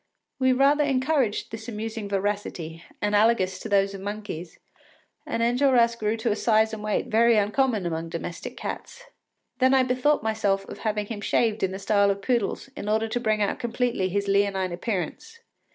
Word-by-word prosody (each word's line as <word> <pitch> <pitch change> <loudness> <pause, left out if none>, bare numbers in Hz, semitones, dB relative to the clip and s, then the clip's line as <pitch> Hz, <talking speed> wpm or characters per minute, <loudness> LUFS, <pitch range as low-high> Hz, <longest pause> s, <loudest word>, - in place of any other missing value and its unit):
” - - -57
We 260 0 +4
rather 280 +3 +4
encouraged 265 -4 0
this 225 +2 -7
amusing 220 -1 -5
voracity, 195 -5 -3 0.2
analogous 205 -2 +2
to - - -7
that 200 -1 +2
of 195 - -7
monkeys, 200 -5 -6 0.7
and 230 - -1
Enjolras 240 -1 +3
grew 220 0 -1
to 220 0 0
a - - +1
size 220 0 +2
and 215 -1 -6
weight 210 -1 0
very 230 +1 +4
uncommon 215 0 +1
among 165 -1 -3
domestic 170 +1 -6
cats. - - -6 0.6
Then 260 +1 +4
I 260 - +5
bethought 255 +2 +1
myself 205 -3 0
of - - -9
having 210 -2 -1
him 205 -1 -6
shaved 220 0 +1
in 190 - +1
the 190 - -4
style 200 0 +2
of 200 0 -2
poodles, 240 -1 0
in 205 - -5
order 220 +1 +1
to 245 - -1
bring 215 -3 +1
out 200 - -1
completely 240 -5 -1
his 200 +2 -1
leonine 195 -2 +1
appearance. 190 - -4
215 Hz, 180 wpm, -25 LUFS, 200-240 Hz, 0.7 s, I